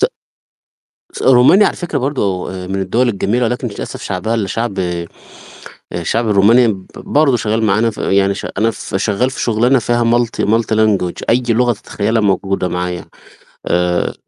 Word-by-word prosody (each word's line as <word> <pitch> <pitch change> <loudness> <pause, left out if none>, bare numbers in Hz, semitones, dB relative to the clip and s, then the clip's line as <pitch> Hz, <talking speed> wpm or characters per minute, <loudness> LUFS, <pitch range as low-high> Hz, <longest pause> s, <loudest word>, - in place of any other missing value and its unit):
ت 435 - +4 1.1
س - - -7
رومانيا 130 +11 +6
على - - -2
فكرة 175 -5 -3
برضُه 115 -9 -2 0.2
من 95 0 -2
الدول 115 +7 +1
الجميلة، 115 +3 0
ولكن 125 +2 -2
للأسف 100 - -7
شعبها 90 +5 -2
اللي 105 -4 -1
شعب 115 -1 -3
آآ، 90 -2 -2 0.9
الشعب 110 +7 -1
الروماني 110 +5 +5
ب 95 -3 -3
برضه 140 -4 +1
شغال 110 0 -1
معانا 110 +3 +2
يعني 100 0 +1
ش - - -6
أنا 110 +3 +2
ف 95 - -7
شغال 105 +5 0
في - - -6
شغلانه 120 +3 +2
فيها 120 +1 0
multi 120 0 +1
multi 115 0 +1
language 100 -5 +1
أي 125 +2 +3
لغة 120 +1 +2
تتخيلّها 110 +1 -2
موجودة 95 -2 0
معايا 90 0 -4 0.6
آآ 90 0 0
110 Hz, 160 wpm, -16 LUFS, 95-120 Hz, 1.1 s, رومانيا